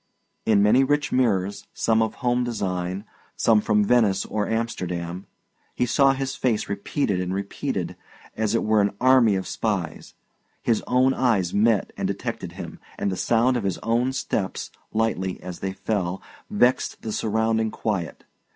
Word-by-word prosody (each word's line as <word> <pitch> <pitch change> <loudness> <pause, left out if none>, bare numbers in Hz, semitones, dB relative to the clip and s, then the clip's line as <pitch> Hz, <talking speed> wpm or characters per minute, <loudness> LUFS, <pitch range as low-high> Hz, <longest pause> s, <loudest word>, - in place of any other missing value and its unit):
In 105 -2 +5
many 115 +6 +5
rich 145 0 +1
mirrors, 100 -5 +1
some 110 0 +2
of 110 -1 -1
home 125 -1 +1
design, 95 -4 -3 0.3
some 110 -2 +4
from 105 0 +2
Venice 110 -4 +3
or 105 -1 -2
Amsterdam, 90 -6 -3 0.5
he 125 - +1
saw 135 +1 +4
his 135 0 -3
face 120 -5 0
repeated 100 0 -1
and 90 +1 -2
repeated, 100 0 -3 0.4
as 110 0 0
it - - +1
were 110 -1 +3
an 100 0 0
army 130 -5 +5
of 95 - -2
spies; 100 -7 -3 0.5
his 115 -2 +2
own 130 +1 +3
eyes 110 -10 +1
met 105 -1 +2
and - - -1
detected - - -4
him; - - -8 0.2
and 100 - -1
the - - -2
sound 120 +5 +2
of 115 - -3
his 95 -3 -1
own 120 +3 +1
steps, 110 -7 -3 0.2
lightly 105 -4 -1
as 90 -2 -7
they 95 - -2
fell, 95 -2 -2 0.3
vexed 130 -12 +1
the 110 - -3
surrounding 110 +1 +1
quiet. 100 -7 -3
110 Hz, 160 wpm, -24 LUFS, 95-120 Hz, 0.5 s, In